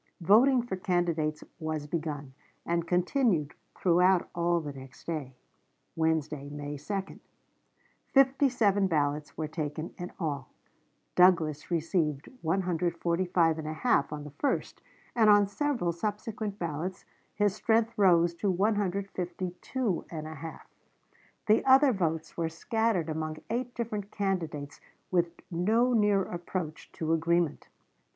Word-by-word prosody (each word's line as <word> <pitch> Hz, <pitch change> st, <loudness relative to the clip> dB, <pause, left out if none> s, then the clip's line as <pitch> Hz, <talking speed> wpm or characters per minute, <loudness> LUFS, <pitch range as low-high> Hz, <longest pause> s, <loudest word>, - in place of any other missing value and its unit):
Voting 240 Hz, +8 st, +5 dB
for 215 Hz, -6 st, -4 dB
candidates 170 Hz, -4 st, 0 dB, 0.2 s
was 155 Hz, -2 st, -3 dB
begun, 150 Hz, -4 st, -4 dB, 0.3 s
and 170 Hz, 0 st, 0 dB
continued 180 Hz, -, +1 dB, 0.2 s
throughout 180 Hz, +1 st, +4 dB
all 170 Hz, 0 st, +1 dB
the 150 Hz, -3 st, -6 dB
next 135 Hz, -1 st, -12 dB
day 150 Hz, -6 st, -4 dB, 0.6 s
(Wednesday, 155 Hz, -3 st, 0 dB
May 145 Hz, 0 st, -5 dB
2). 195 Hz, +6 st, -4 dB, 0.9 s
Fifty 270 Hz, +1 st, +4 dB
seven 205 Hz, -5 st, +2 dB
ballots 150 Hz, -3 st, -1 dB
were 155 Hz, -, -2 dB
taken 155 Hz, +1 st, -4 dB
in 175 Hz, 0 st, -5 dB
all; 145 Hz, -6 st, -3 dB, 0.6 s
Douglas 165 Hz, -5 st, +4 dB
received 160 Hz, -4 st, 0 dB
145 170 Hz, -1 st, +1 dB
1/2 155 Hz, -2 st, 0 dB
on 150 Hz, -1 st, -5 dB
the 150 Hz, -, -9 dB
first, 285 Hz, -, -1 dB, 0.3 s
and 220 Hz, -3 st, +5 dB
on 205 Hz, -1 st, +7 dB
several 235 Hz, -3 st, -1 dB
subsequent 210 Hz, +2 st, -4 dB
ballots 170 Hz, +1 st, -4 dB, 0.3 s
his 205 Hz, -1 st, +2 dB
strength 225 Hz, +2 st, +1 dB
rose 175 Hz, -5 st, +4 dB
to 195 Hz, +4 st, -1 dB
152 190 Hz, +1 st, -1 dB
1/2. 155 Hz, 0 st, -7 dB, 0.9 s
The 215 Hz, +1 st, +4 dB
other 265 Hz, 0 st, +6 dB
votes 165 Hz, -4 st, -2 dB
were 165 Hz, -1 st, -1 dB
scattered 220 Hz, 0 st, 0 dB
among 155 Hz, 0 st, -3 dB
eight 245 Hz, +1 st, -2 dB
different 215 Hz, -4 st, -3 dB
candidates 165 Hz, -9 st, -3 dB, 0.3 s
with 175 Hz, -2 st, +3 dB, 0.2 s
no 220 Hz, +9 st, +2 dB
near 205 Hz, -3 st, +3 dB
approach 175 Hz, -3 st, -5 dB
to 160 Hz, 0 st, -1 dB
agreement. 165 Hz, 0 st, +1 dB
175 Hz, 115 wpm, -29 LUFS, 155-205 Hz, 0.9 s, on